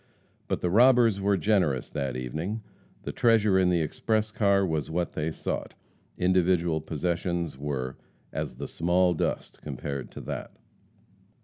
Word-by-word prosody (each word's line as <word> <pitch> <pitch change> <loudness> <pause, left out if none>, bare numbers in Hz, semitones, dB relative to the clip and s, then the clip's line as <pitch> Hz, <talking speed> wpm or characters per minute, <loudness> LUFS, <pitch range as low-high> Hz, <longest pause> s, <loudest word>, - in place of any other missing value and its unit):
But - - -1
the 90 - 0
robbers 120 -2 +5
were 100 0 +2
generous 90 -12 +1
that 70 -4 -2
evening. 80 - -4 0.4
The - - -4
treasure 110 -5 +4
in 90 -1 +3
the 85 -2 +2
express 110 +7 0
car 100 -2 +3
was 80 -4 -2
what 85 +2 -1
they 75 +1 -2
sought. 80 - -4 0.4
Individual 90 -3 +2
possessions 85 +1 -2
were 65 -2 -4 0.4
as - - -3
"the - - -5
small 90 +2 +2
dust" 80 - -3
compared 70 -2 -5
to - - -7
that. - - -6
90 Hz, 140 wpm, -27 LUFS, 75-100 Hz, 0.4 s, robbers